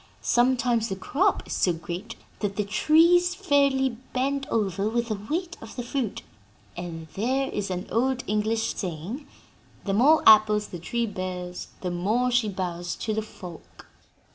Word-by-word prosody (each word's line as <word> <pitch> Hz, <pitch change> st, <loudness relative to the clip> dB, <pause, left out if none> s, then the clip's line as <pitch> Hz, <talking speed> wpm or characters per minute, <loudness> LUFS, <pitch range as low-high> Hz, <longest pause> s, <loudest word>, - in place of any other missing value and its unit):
Sometimes 240 Hz, -2 st, +2 dB
the 190 Hz, -, -2 dB
crop 235 Hz, +9 st, +1 dB
is -, -, -5 dB
so 180 Hz, -, +2 dB
great 175 Hz, +7 st, -6 dB, 0.2 s
that 200 Hz, -2 st, -2 dB
the 210 Hz, -, 0 dB
trees 335 Hz, -, +4 dB
fairly 280 Hz, -7 st, +2 dB, 0.2 s
bend 275 Hz, +2 st, 0 dB
over 200 Hz, -2 st, 0 dB
with 235 Hz, +1 st, -1 dB
the 215 Hz, -2 st, -2 dB
weight 340 Hz, +2 st, -2 dB
of 225 Hz, -, -10 dB
the 245 Hz, -, -4 dB
fruit, 245 Hz, -3 st, -3 dB, 0.5 s
and 165 Hz, -2 st, -6 dB
there 260 Hz, +6 st, 0 dB
is 205 Hz, -2 st, -3 dB
an 180 Hz, 0 st, -3 dB
old 255 Hz, +3 st, +1 dB
English 215 Hz, +2 st, 0 dB
saying: 190 Hz, -, -5 dB, 0.6 s
'The 195 Hz, -, 0 dB
more 285 Hz, +10 st, +5 dB
apples 215 Hz, -1 st, +6 dB
the 175 Hz, -, -7 dB
tree 235 Hz, +7 st, -1 dB
bears, 180 Hz, -3 st, -5 dB
the 180 Hz, -, -2 dB
more 215 Hz, +8 st, +1 dB
she 240 Hz, -3 st, +2 dB
bows 175 Hz, -2 st, -3 dB
to 220 Hz, -, -3 dB
the 220 Hz, -, 0 dB
folk.'" 180 Hz, -5 st, -11 dB
220 Hz, 160 wpm, -26 LUFS, 190-260 Hz, 0.6 s, apples